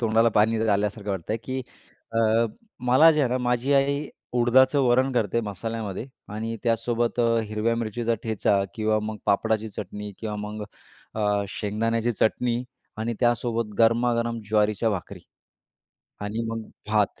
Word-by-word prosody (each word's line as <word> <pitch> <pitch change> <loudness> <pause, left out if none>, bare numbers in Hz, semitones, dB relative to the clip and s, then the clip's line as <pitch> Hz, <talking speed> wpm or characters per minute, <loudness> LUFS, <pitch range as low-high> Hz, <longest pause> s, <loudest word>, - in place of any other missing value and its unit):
तोंडाला 115 0 +4
पाणी 110 +2 +4
आल्यासारखं 105 0 0
वाटतंय, 95 +3 -2
की 130 0 -3 0.5
अ, 115 - 0 0.7
मला 155 +6 +7
जे 150 - +1
आहे 130 - +2
ना, 125 - 0
माझी 125 +2 0
आई 140 +2 +1 0.2
उडदाचं 130 +3 +4
वरण 130 +2 +3
करते 115 -1 +1
मसाल्यामध्ये. 110 +1 -4 0.2
आणि 110 +2 -4
त्यासोबत 120 +1 0
अ, 115 -1 +3
हिरव्या 110 +2 0
मिरचीचा 115 +1 -1
ठेचा 105 -3 +1
किंवा 110 -1 +1
मग 110 0 -4
पापडाची 110 +2 +1
चटणी 105 +1 -7
किंवा 105 -2 -4
मग 105 0 -6 0.5
अ, 105 -2 +1
शेंगदाण्याची 115 +4 -1
चटणी 120 +2 +1 0.4
आणि 115 +2 -2
त्यासोबत 115 -2 0
गरमागरम 115 0 +2
ज्वारीच्या 105 +1 +2
भाकरी. 95 -4 -5 1.0
आणि 105 +3 -3
मग 115 0 -3 0.3
भात 105 -4 +1
115 Hz, 135 wpm, -25 LUFS, 105-120 Hz, 1.0 s, मला